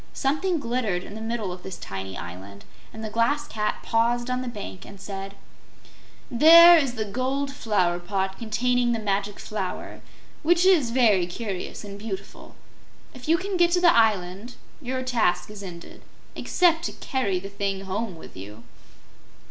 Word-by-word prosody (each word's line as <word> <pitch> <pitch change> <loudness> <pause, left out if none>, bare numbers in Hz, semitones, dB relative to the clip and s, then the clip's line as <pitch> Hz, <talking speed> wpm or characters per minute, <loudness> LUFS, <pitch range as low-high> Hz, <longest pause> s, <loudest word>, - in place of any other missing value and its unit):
Something 310 +6 0
glittered 230 -9 -1
in - - -10
the 220 - -7
middle 225 -4 -3
of 180 0 -8
this 190 -2 -7
tiny 95 -1 -6
island, 95 +3 -9 0.3
and 220 - -9
the 215 - -5
Glass 285 +7 +1
Cat 210 -4 -3
paused 240 +2 +1
on 250 0 -1
the 255 - -5
bank 205 -5 -7
and 200 - -12
said: 195 0 -7 1.0
"There 335 +7 +9
is 270 -5 -1
the 220 -2 -2
gold 260 +6 -2
flower 185 -9 0
pot 190 +1 -3
containing 240 +2 +1
the 230 - -1
Magic 200 -1 -2
Flower, 195 -4 -5 0.4
which 345 +3 +3
is 340 -10 +5
very 220 -7 +3
curious 195 +1 -5
and 200 -1 -9
beautiful. 195 -2 -8 0.6
If 255 +1 -11
you 330 - +5
can 380 +1 -3
get 345 -1 +4
to 360 - +4
the 350 -1 +5
island, 210 0 +1 0.3
your 260 -1 -3
task 215 -7 0
is 210 -1 -9
ended 175 -3 -10 0.3
except 335 -3 +2
to - - -3
carry 230 -9 -1
the 195 - -8
thing 200 -1 -3
home 195 +1 -4
with 160 - -13
you." 105 +4 -10
220 Hz, 165 wpm, -25 LUFS, 190-255 Hz, 1.0 s, There